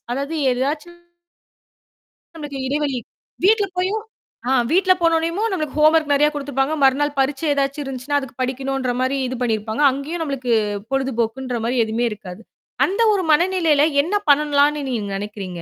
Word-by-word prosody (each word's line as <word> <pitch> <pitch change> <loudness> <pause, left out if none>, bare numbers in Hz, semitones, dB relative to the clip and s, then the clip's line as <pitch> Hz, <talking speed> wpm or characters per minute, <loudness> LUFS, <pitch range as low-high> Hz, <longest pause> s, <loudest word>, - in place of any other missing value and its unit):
அதாவது 280 +5 -3 0.2
ஏதாச்சும் 295 +7 -3 1.4
நம்மளுக்கு 295 -3 -6
இடைவெளி. 285 -2 -1 0.5
வீட்டு்ல 420 -1 +4
போயும் 405 +4 0 0.5
ஆ - - +2 0.2
வீட்ல 370 +1 +4
போனோனையுமும் 335 +6 +1
நம்மளுக்கு 310 -6 -3
ஹோம்வொர்க் 310 -1 +4
நெறையா 295 +1 +4
குடுத்துருப்பாங்க. 275 0 -1
மறுநாள் 285 +2 +3
பரீட்சை 275 +3 0
ஏதாச்சும் 280 +1 -1
இருந்துச்சுன்னா, 270 +2 -2
அதுக்கு 265 -2 -9
படிக்கணுன்ற 265 0 -2
மாரி 260 +2 0
இது 255 - -4
பண்ணியிருப்பாங்க. 220 +1 -1
அங்கேயும் 295 +6 -5
நம்மளுக்கு 270 -5 -3 0.4
பொழுதுபோக்குன்ற 255 -1 -1
மாரி 245 +2 -1
எதுவுமே 225 +2 -1
இருக்காது. 200 0 -9 0.5
அந்த 395 +5 -1
ஒரு 385 - 0
மனநிலையில 330 -3 +3 0.2
என்ன 360 +7 -2 0.2
பண்ணலான்னு 290 0 +2
நீங்க 220 -5 -3
நினைக்கிறீங்க? 195 -4 -6
280 Hz, 135 wpm, -21 LUFS, 255-310 Hz, 1.4 s, வீட்டு்ல